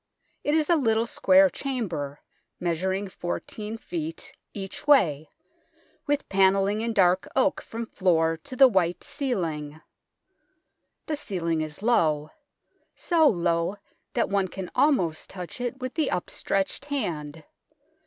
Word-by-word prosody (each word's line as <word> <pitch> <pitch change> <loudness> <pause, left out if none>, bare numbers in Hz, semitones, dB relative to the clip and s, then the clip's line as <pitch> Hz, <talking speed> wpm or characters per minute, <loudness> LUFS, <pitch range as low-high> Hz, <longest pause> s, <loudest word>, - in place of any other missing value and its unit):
It 295 - +1
is 310 -2 +2
a 345 - +4
little 225 -6 +2
square 290 +2 +5
chamber, 180 - -4 0.4
measuring 190 +3 -1
14 210 +4 -5
ft. 165 -6 -5 0.2
each 195 +6 -7
way, 160 - +4 0.8
with 290 0 0
panelling 195 +2 +3
in 230 0 -1
dark 185 -3 +3
oak 275 +2 +2
from 230 +1 -6
floor 165 -6 +2
to 255 +11 -9
the 270 +1 +8
white 180 -6 +1
ceiling. 165 - -3 1.3
The 310 - -2
ceiling 170 - -2
is 155 +5 -6
low 155 -10 +2 0.6
so 330 -3 +3
low 170 -3 +1 0.4
that - - +1
one 200 -1 +1
can 185 0 -7
almost 185 - +2
touch 180 +5 -7
it 245 +1 -3
with 255 -1 -4
the 315 -3 0
upstretched 195 +6 -2
hand. 160 - -3
195 Hz, 125 wpm, -26 LUFS, 170-255 Hz, 1.3 s, the